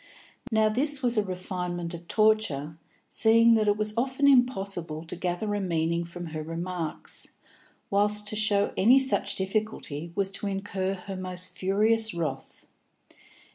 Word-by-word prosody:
Now 220 -1 +3
this 270 +5 +1
was 240 -1 +3
a 215 - +3
refinement 180 -2 -4
of 170 0 -9
torture, 215 -10 +1 0.3
seeing 230 0 +5
that 215 -2 +2
it 205 0 +3
was 215 0 -2
often 265 +4 +1
impossible 195 - +2
to 165 - -6
gather 180 +4 -2
a 205 - -1
meaning 170 -1 0
from 175 +1 -8
her 155 - -3
remarks, 165 0 -4 0.6
whilst 210 +1 +1
to 215 - -3
show 210 -1 +1
any 240 +7 +5
such 265 0 +2
difficulty 190 -6 -3
was 195 -1 0
to 205 - -2
incur 195 -1 -2
her 190 +1 -8
most 185 -1 -6
furious 215 +3 +2
wrath. 145 -6 -5
195 Hz, 145 wpm, -27 LUFS, 175-215 Hz, 0.6 s, seeing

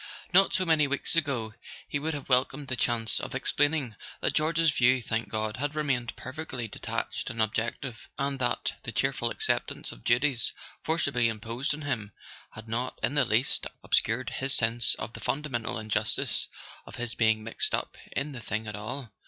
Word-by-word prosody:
Not 195 +2 +7
so 185 - +2
many 155 -3 +4
weeks 140 +4 +2
ago 130 -9 0 0.3
he 145 - -1
would 155 +2 -2
have 145 - -6
welcomed 135 +2 +2
the 130 - 0
chance 115 -3 +1
of - - -5
ex¬ - - -2
plaining 145 -6 +2 0.2
that - - +1
George's 160 +1 +3
view, 130 -1 +4
thank 110 -2 -2
God, 110 +1 -1
had 145 +3 -2
remained 130 -6 0
perfectly 130 -3 -5
detached - - -3
and 115 - -5
objective, 110 +2 -1
and 140 -1 -1
that 125 -1 +1
the - - -5
cheer¬ - - +2
ful - - 0
acceptance - - -1
of - - -12
duties 125 0 +2 0.3
forcibly 140 -7 +2
imposed 115 +6 -2
on 155 - -8
him 115 -8 -3 0.4
had 110 +1 -10
not 120 +3 -2
in 130 - +2
the 145 -3 +4
least 120 +3 +2 0.2
obscured 115 +4 +2
his 135 +1 +2
sense 115 +1 +4
of 115 - -6
the - - -8
fundamental 135 -6 -2
injustice 110 -1 -1 0.4
of - - -9
his 120 -1 -2
being 110 -1 +3
mixed 110 - +1
up - - -4 0.2
in 140 +2 -1
the 130 -4 -7
thing 110 +2 -2
at 105 -2 -5
all. 115 +3 -5
125 Hz, 185 wpm, -29 LUFS, 110-145 Hz, 0.4 s, Not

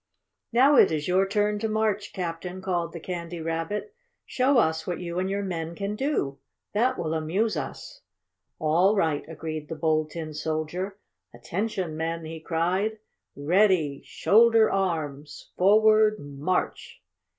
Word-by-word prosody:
"Now 265 +4 +5
it - - +6
is 150 -2 -2
your 190 +2 +3
turn 210 +1 +1
to 220 - -1
march, 215 -2 0
Captain!" 180 +1 -5
called 175 -3 -2
the 170 - -7
Candy 170 0 -5
Rabbit. 165 - -3 0.3
"Show 260 +1 +2
us 160 -7 +1
what 175 -2 -2
you 175 0 -4
and 185 +1 -1
your 200 +1 -1
men 170 -3 -4
can 200 +2 -3
do. 210 - -1 0.3
That 250 +5 +2
will 160 -1 -2
amuse 175 +8 0
us." - - -6 0.6
"All 175 +6 +3
right!" 160 -7 +1
agreed 155 -1 -6
the 160 - -4
Bold 155 -1 +1
Tin 155 -1 -6
Soldier. 160 +6 -3 0.4
"Attention, 185 - -3
men!" 165 +1 -3
he 160 0 -7
cried, 180 +7 -1 0.4
"Ready! 160 -2 +2
Shoulder 225 +1 +4
arms! 155 -7 -3
Forward 215 +2 +5
March!" 145 +4 -3
180 Hz, 140 wpm, -26 LUFS, 160-210 Hz, 0.6 s, it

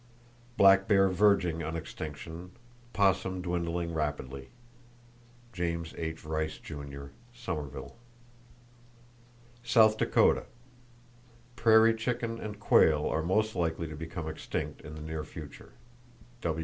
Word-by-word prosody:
Black 100 0 +6
bear 95 -2 +5
verging 95 -3 +3
on 80 +1 -4
extinction, 80 +2 -7 0.4
opossum 95 -2 +1
dwindling 85 -1 -2
rapidly.—(James 120 - -6
H. 80 -1 -5
Rice 80 0 -2
Jr., 70 -2 -8 0.3
Summerville.) 75 - -5 1.7
South 110 -2 +5
Dakota: - - +3 1.1
Prairie 115 -1 +6
chicken 115 0 -2
and 105 -1 -6
quail 80 -6 +4
are 80 - 0
most 110 +6 +1
likely 85 -1 -1
to 80 - -7
become 80 +1 -6
extinct 80 - -4
in 75 - -9
the 75 - -8
near 80 0 -4
future. 75 -2 -11
85 Hz, 100 wpm, -30 LUFS, 80-110 Hz, 1.7 s, Black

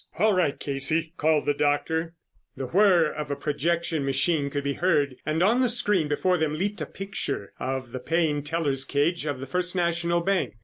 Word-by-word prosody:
"All 215 +4 +4
right, 180 -6 +1
Casey," 155 +4 -1
called 155 0 +2
the 145 - +2
doctor. 160 +4 0 0.4
The 135 - -3
whir 175 0 +4
of 150 -1 -5
a 140 - -1
projection 160 +1 -1
machine 140 +2 +1
could 140 0 -3
be 140 0 -1
heard 145 -6 +1
and 160 +3 +1
on 230 +6 +3
the 250 - +3
screen 210 -8 +2
before 180 +4 +1
them 155 -1 0
leaped 205 +6 -2
a - - -3
picture 195 - -4
of 130 -1 -3
the 130 - -5
paying 155 +1 0
teller's 145 -3 -1
cage 150 +4 0
of 145 -3 -2
the 135 - -5
First 180 +6 -2
National 170 -1 +1
Bank. 190 - 0
160 Hz, 190 wpm, -26 LUFS, 145-175 Hz, 0.4 s, All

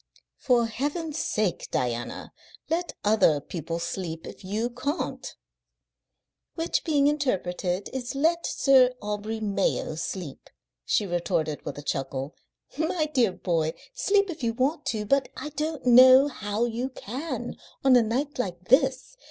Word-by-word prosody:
"For 245 -3 +3
Heaven's 295 +7 -3
sake, 210 -5 -1
Diana, 120 -1 -3 0.4
let 345 +1 -1
other 205 -8 +4
people 165 +2 -5
sleep 170 -1 -4
if - - -10
you 215 +6 -2
can't." 280 +6 -4 1.2
"Which, 330 0 -1
being 295 -4 +2
interpreted, 195 -10 0
is 260 0 -4
let 330 +4 +1
Sir 255 -2 +4
Aubrey 210 +2 -4
Mayo 200 -6 0
sleep," 160 -1 -6 0.4
she 210 - +2
retorted, 170 -4 -1
with - - -5
a 145 - -7
chuckle. 135 +1 -3 0.5
"My 315 -1 0
dear 235 -7 +3
boy, 165 -3 -1 0.2
sleep 400 -2 +2
if 320 - -9
you 230 -2 0
want 270 +7 -1
to, 215 -3 -1
but 275 +4 +2
I 300 - -5
don't 300 -1 -4
know 255 +3 +8
how 210 -4 -2
you 240 +2 -2
can 255 0 -5 0.3
on 265 -1 +6
a 245 - +7
night 255 +6 -2
like 180 -5 -4
this. 265 - +2
240 Hz, 140 wpm, -26 LUFS, 185-280 Hz, 1.2 s, know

